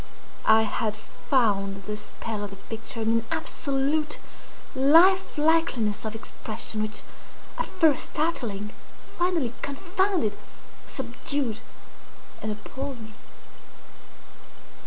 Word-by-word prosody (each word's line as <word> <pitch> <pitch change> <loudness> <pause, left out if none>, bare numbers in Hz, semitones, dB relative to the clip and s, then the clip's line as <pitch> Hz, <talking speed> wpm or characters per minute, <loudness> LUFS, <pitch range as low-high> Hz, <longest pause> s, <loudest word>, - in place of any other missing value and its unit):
I 220 0 +7
had 215 0 -1
found 200 -4 0
the 210 +2 -3
spell 210 0 -5
of 205 - -4
the 195 - -9
picture 225 +2 -5
in 220 - +2
an 230 0 +2
absolute 285 +2 0 0.6
life 330 +9 +6
likeliness 295 -10 +2
of 220 0 -3
expression, 220 0 -3
which, 215 0 -2 0.6
at - - 0
first 315 -4 +3
startling, 225 -10 -1 0.5
finally 340 -9 +1
confounded, 350 - 0 0.5
subdued, 270 -7 -2 0.8
and 215 - -2
appalled 265 +5 -6
me. 220 -1 -10
230 Hz, 100 wpm, -27 LUFS, 215-300 Hz, 0.8 s, I